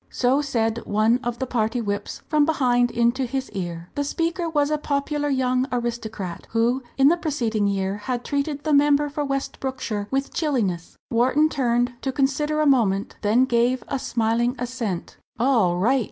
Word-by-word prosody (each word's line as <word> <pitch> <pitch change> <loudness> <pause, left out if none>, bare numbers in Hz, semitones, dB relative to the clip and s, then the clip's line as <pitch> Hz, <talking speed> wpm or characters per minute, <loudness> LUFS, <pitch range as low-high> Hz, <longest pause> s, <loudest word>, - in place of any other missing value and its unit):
So 260 +3 +2
said 230 -5 0
one 215 +4 +3
of 240 -1 -2
the 260 - -2
party 230 -1 -1
whips, 205 -2 -4
from 305 -1 +3
behind 250 -6 +2
into 235 +2 +1
his 265 +1 -3
ear. 175 -2 -5
The 285 - -1
speaker 335 +3 -1
was 295 -2 +1
a 305 - +1
popular 290 0 -1
young 255 -1 +1
aristocrat 225 -7 -4
who 235 +3 +2 0.2
in 270 +1 +6
the 345 - +3
preceding 235 -11 -1
year 195 0 -1
had 245 +3 -4
treated 285 0 -2
the 310 - +1
member 290 0 +4
for 295 +1 -3
West 275 -1 -3
Brookshire 235 -6 -3
with 270 +1 -2
chilliness. 225 - -1
Wharton 260 +6 +3
turned 245 -3 +1
to 270 - -1
consider 295 +3 0
a - - +2
moment 220 -8 +2
then 225 +5 +3
gave 245 0 +1
a 275 - -1
smiling 235 +1 0
assent. 235 -7 -4 0.2
"All 225 -8 +2
right!" 245 +9 +3
250 Hz, 170 wpm, -23 LUFS, 225-280 Hz, 0.2 s, in